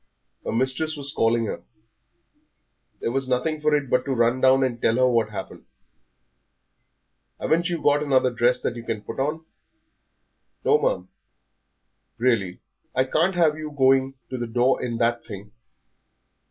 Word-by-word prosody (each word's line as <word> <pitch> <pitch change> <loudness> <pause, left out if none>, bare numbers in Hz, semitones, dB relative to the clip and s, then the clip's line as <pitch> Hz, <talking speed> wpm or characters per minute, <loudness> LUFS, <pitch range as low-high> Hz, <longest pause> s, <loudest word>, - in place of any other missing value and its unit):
Her - - -3
mistress 130 +6 0
was 140 0 -1
calling 115 0 +2
her; - - -5 1.4
there - - -1
was 135 +1 -1
nothing 140 +5 -1
for 150 0 +3
it 145 -2 -1
but 125 +1 +1
to 135 -2 -1
run 120 +2 +2
down 130 +1 +5
and 120 -3 -2
tell 115 - +2
her 130 +1 +4
what 115 -3 +1
had 105 - -8
happened. 95 - -8 1.7
"Haven't 170 +2 +1
you 170 -3 -3
got 145 0 +3
another 130 -3 +2
dress 120 +1 +2
that 120 - -2
you 120 - -7
can 110 -2 -4
put 115 - -7
on?" 155 +4 -2 1.2
"No, - - +4
ma'am." 90 0 -1 1.1
"Really, 110 -7 0 0.3
I 130 - +3
can't 165 +8 +1
have 165 -3 +3
you 155 -1 -5
going 135 -1 +2 0.2
to 130 - -4
the 120 - -3
door 120 +3 +1
in 120 -2 -3
that 115 0 0
thing. 100 +1 -10
130 Hz, 160 wpm, -24 LUFS, 115-145 Hz, 1.7 s, down